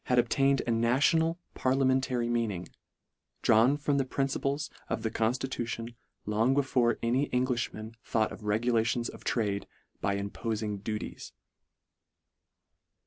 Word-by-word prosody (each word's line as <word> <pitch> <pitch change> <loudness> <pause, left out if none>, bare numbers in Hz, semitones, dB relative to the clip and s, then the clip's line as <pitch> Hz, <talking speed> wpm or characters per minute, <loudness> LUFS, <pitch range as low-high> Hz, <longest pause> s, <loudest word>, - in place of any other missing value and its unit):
obtained 130 +2 +3
a 120 - 0
national, 145 +9 +3 0.2
parliamentary 130 -2 +1
meaning, 115 -7 -1 0.8
drawn 120 +6 +5
from 145 -1 +1
the - - +3
principles 140 +2 -1 0.2
of 110 - -2
the 110 - -1
constitu 120 +2 -1
tion, 115 0 -5 0.3
long 110 +5 +2
before 130 -4 +2
any 125 +5 +1
Englishmen 120 -3 -1
thought 110 -2 0
of - - -9
regulations 115 +2 +1
of - - -11
trade 100 -4 -1 0.2
" - - -44
by 100 - +1
impofing 105 +1 -3
duties." 105 0 -5
120 Hz, 120 wpm, -30 LUFS, 110-135 Hz, 0.8 s, drawn